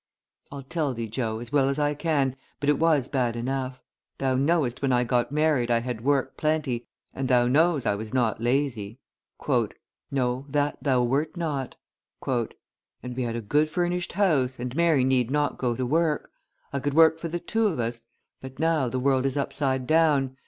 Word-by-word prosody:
"I'll 140 -1 -7
tell 145 -1 -2
thee, 115 0 -4
Joe, 110 0 -2
as 120 +2 -7
well 135 -2 +3
as 140 - -1
I 145 0 +1
can, 145 -4 0 0.2
but 145 - 0
it 150 - +3
was 155 -5 +3
bad 125 -4 0
enough; 130 +1 -3 0.3
thou 135 -1 0
knowest 135 -2 +1
when 135 -2 +1
I 125 0 +3
got 120 +1 0
married 150 -5 +2
I 115 -1 +3
had 120 -2 -5
work 135 -1 +1
plenty, 150 -6 -1 0.3
and 135 - -3
thou 125 -1 +4
knows 155 +2 +3
I - - +2
was 110 +2 -6
not 120 -4 0
lazy." 120 -4 -1 1.1
"No, 130 0 -1
that 145 0 0
thou 130 -3 +2
wert 145 +7 0
not." 145 -6 -3 0.5
"And 125 0 -5
we 130 - -2
had 115 -2 -2
a 120 - -3
good 150 +8 +1
furnished 175 +2 -1
house, 150 -10 +2
and 125 +1 -5
Mary 165 -5 +3
need 130 -2 +2
not 145 +1 0
go 120 -2 0
to 130 - -2
work. 155 +3 0 0.4
I 140 - 0
could 145 +1 -2
work 160 0 +6
for 170 - -4
the 175 +2 -3
two 220 +6 0
of 165 -10 -2
us; 115 0 -2 0.4
but 130 0 -9
now 160 -5 +1
the 130 - -3
world 135 0 +2
is 135 - -3
upside 135 -2 -1
down. 145 -4 +3
135 Hz, 190 wpm, -26 LUFS, 125-150 Hz, 1.1 s, work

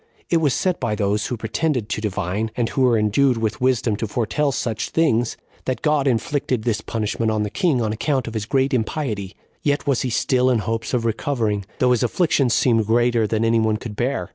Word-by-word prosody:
It 170 - +5
was 150 -5 +2
said 185 -2 0
by 115 -4 -1
those 105 +1 0
who 125 - -3
pretended 115 +2 -1
to 110 - -2
divine, 105 +1 -2
and 120 -2 0
who 135 - -1
were 125 -3 +4
endued 115 +5 +2
with 110 0 -2
wisdom 125 -4 +2
to 110 - -3
foretell 125 +7 0
such 115 -4 -2
things, 120 -8 +1 0.3
that 130 - -3
God 150 -2 +2
inflicted 125 -1 0
this 110 -3 0
punishment 110 0 -1
on 110 -1 0
the 105 - -4
king 155 - +1
on 110 -1 -1
account 130 +2 -1
of 115 - -5
his 110 -1 -3
great 135 +1 +1
impiety; 110 -5 -2 0.3
yet 145 +1 0
was 140 -4 +1
he 130 - -1
still 125 +2 +2
in 125 - +3
hopes 115 +3 -2
of 115 -2 -1
recovering, 110 -3 -1
though 125 -1 +3
his 125 - +2
afflictions 135 -2 +2
seemed 115 -4 +2
greater 120 -1 +2
than 110 +1 0
any 115 0 +3
one 110 -1 +1
could 110 -1 -8
bear. 120 -6 -1
115 Hz, 215 wpm, -22 LUFS, 110-130 Hz, 0.3 s, It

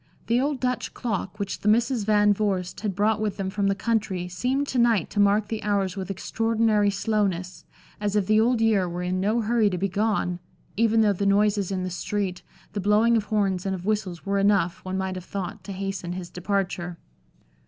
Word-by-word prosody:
The 235 +2 +2
old 285 -1 -1
Dutch 250 0 -2
clock, 210 -4 -3
which 200 -2 -3
the - - -4
Misses 230 +1 +2
Van 210 -1 +4
Vorst 195 -3 -2
had 205 -4 -3
brought 215 +1 +2
with 210 -3 -2
them 190 -1 -3
from 200 0 0
the 195 - +2
country 205 -5 -1
seemed 250 +10 -1
to 255 - 0
night 230 -7 +2
to 205 - -2
mark 205 +1 +3
the 220 -1 -4
hours 200 -2 0
with 195 -1 -5
extraordinary 220 +1 +1
slowness, 200 -3 -1 0.3
as 205 -1 -1
if 205 -2 +2
the 215 +2 +4
Old 235 0 +2
Year 205 -5 +3
were 175 +1 -4
in 180 +1 -1
no 215 +5 +1
hurry 225 -1 +2
to 180 - -2
be 195 +3 0
gone, 200 -3 0 0.4
even 225 0 +3
though 210 -2 +4
the 200 +1 -1
noises 200 -1 +2
in 185 -1 -2
the 185 - -3
street, 185 0 -3 0.3
the 210 - -2
blowing 210 +4 +4
of 215 -2 +1
horns 200 -4 0
and 195 -1 -1
of 180 0 -8
whistles 205 -5 -2
were 200 0 +1
enough, 195 -4 +2
one 185 0 -3
might 190 0 -2
have 185 -1 -6
thought, 195 -3 -5
to 200 - -6
hasten 195 -2 -4
his 180 -1 -7
departure. 180 -2 -2
205 Hz, 210 wpm, -25 LUFS, 185-215 Hz, 0.4 s, Van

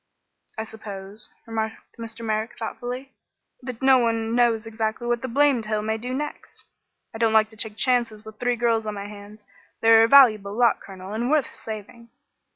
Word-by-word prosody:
"I 220 - -2
suppose," 205 -2 -10 0.2
remarked 220 -1 -5
Mr. 230 0 -7
Merrick, 220 +1 -2
thoughtfully, 250 +3 -6 0.5
"that 250 -1 -7
no 265 -1 +6
one 225 -1 0
knows 235 -2 +2
exactly 225 +1 -3
what 240 0 0
the 260 - -3
blamed 260 -3 +2
hill 215 -1 -1
may 220 +1 -1
do 250 +3 -5
next. 295 +3 -6 0.5
I 225 - -7
don't 225 -1 +2
like 220 0 +4
to - - -15
take 220 -1 -3
chances 235 -4 0
with 220 -1 -12
three 245 0 +1
girls 230 -2 +1
on 210 - -3
my 200 0 -6
hands. 205 0 -12 0.3
They 225 - +4
are 225 0 +8
a - - +5
valuable 215 -7 +6
lot, 240 -1 +3
Colonel, 190 +1 -9
and 235 +3 -1
worth 300 -3 +1
saving." 225 +2 -8
225 Hz, 185 wpm, -24 LUFS, 215-240 Hz, 0.5 s, are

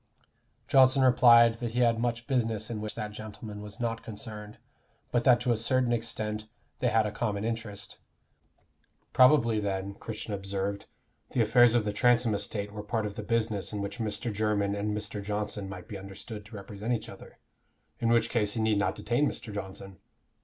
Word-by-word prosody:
Johnson 130 0 +5
replied 120 -2 +6
that 120 -2 -4
he 125 - +1
had 115 -2 +3
much 120 0 -1
business 115 -4 -1
in 110 -2 -4
which 105 +1 -5
that 105 -2 -4
gentleman 105 0 -8
was 105 +2 -9
not 115 -1 -2
concerned, 105 -1 -8 0.5
but 120 - +1
that 125 -2 +6
to 125 0 +1
a 115 - +2
certain 125 +1 +2
extent 110 -2 -3 0.3
they 125 - +1
had 110 -2 +3
a 105 - -2
common 105 -1 -2
interest. 115 -3 -5 1.1
Probably 125 -4 +5
then, 100 -1 -3
Christian 110 +1 -6
observed, 100 0 -3 0.5
the 125 - +2
affairs 120 +2 +5
of 115 -3 +2
the 105 - -1
Transome 120 0 +3
estate 100 0 -2
were 105 0 -6
part 110 +1 -2
of 100 -1 -5
the - - -4
business 110 -2 -1
in 105 - -4
which 100 +2 -5
Mr. 110 0 -1
Jermyn 105 -1 0
and 105 +1 -2
Mr. 105 0 -4
Johnson 105 -1 -3
might 100 - -8
be 105 -4 -7
understood 100 +2 -9
to 110 - -12
represent 105 +3 -4
each 110 -2 -3
other, - - -12 0.6
in 115 - +1
which 115 -1 +3
case 105 -2 +1
he - - -2
need 110 -2 +2
not 100 - 0
detain 120 +7 +1
Mr. 110 - -7
Johnson? 95 -1 -7
110 Hz, 185 wpm, -29 LUFS, 105-115 Hz, 1.1 s, replied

